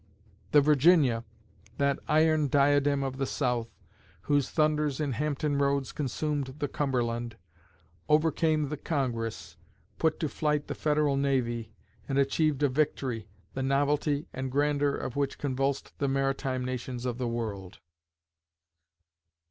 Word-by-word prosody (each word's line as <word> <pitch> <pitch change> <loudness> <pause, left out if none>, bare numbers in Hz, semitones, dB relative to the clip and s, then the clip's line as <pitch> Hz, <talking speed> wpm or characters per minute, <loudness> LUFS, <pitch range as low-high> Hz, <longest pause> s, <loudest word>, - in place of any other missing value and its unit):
The 145 - +7
Virginia, 145 -4 +4 0.5
that 140 -1 +1
iron 155 -1 +3
diadem 140 0 +3
of 135 -1 -3
the 135 -1 -1
South, 125 -4 -1 0.5
whose 145 -2 +1
thunders 150 -2 +1
in 150 -3 -1
Hampton 145 +2 -1
Roads 140 -1 +1
consumed 145 -1 -2
the 145 - -1
Cumberland, 120 -5 -2 0.7
overcame 155 -1 +2
the 150 - -4
Congress, 120 -7 -3 0.4
put 160 -1 +1
to 155 - 0
flight 150 0 -1
the - - -4
Federal 150 -2 +1
Navy, 120 -5 0 0.4
and 135 - 0
achieved 145 +1 +2
a - - +6
victory, 130 -5 -1 0.3
the 135 - -3
novelty 145 +2 +1
and 130 0 -4
grandeur 145 0 +1
of 125 - -5
which 140 -1 -1
convulsed 135 0 -2
the 140 - +1
maritime 135 -1 -1
nations 125 -1 -4
of 125 -1 -2
the 125 - -1
world. 105 -6 -4
140 Hz, 130 wpm, -29 LUFS, 130-150 Hz, 0.7 s, The